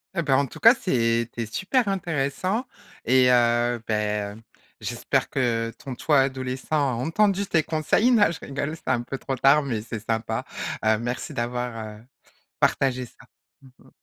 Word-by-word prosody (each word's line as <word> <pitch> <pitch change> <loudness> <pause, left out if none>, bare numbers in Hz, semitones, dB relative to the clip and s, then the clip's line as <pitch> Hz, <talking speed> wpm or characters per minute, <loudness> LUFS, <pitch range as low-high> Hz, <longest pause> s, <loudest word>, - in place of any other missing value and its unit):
Heu 170 - +1
bah 135 -3 +3
en 140 - +1
tout - - -12
cas, 230 +2 +8
c'était 115 - 0
super 195 - 0
intéressant 185 - -1 0.4
et 130 +1 +5
heu 120 -1 +3
bah 105 -1 -1
heu, 110 - -14 0.4
j'espère - - -1
que 115 -3 0
ton 135 -3 -6
toi 145 +1 +3
adolescent, 130 -1 -3
a 140 -4 +2
entendu 195 - +1
tes 165 -5 +1
conseils. 160 - +2
Non 210 -7 +5
je 160 - -7
rigole 145 +2 -4
c'est - - -20
un 120 - +2
peu 135 +3 -6
trop 135 0 -4
tard, 140 +4 +4
mais 115 -6 -2
c'est 110 0 -6
sympa. 110 0 -2 0.4
Heu 110 0 +4
merci 120 +1 -4
d'avoir, 120 -3 -4
heu, - - -18 0.6
partagé 130 -2 +1
ça. - - -18 0.4
Mmh 135 - -17 0.2
mh. - - -19
130 Hz, 170 wpm, -24 LUFS, 115-155 Hz, 0.6 s, cas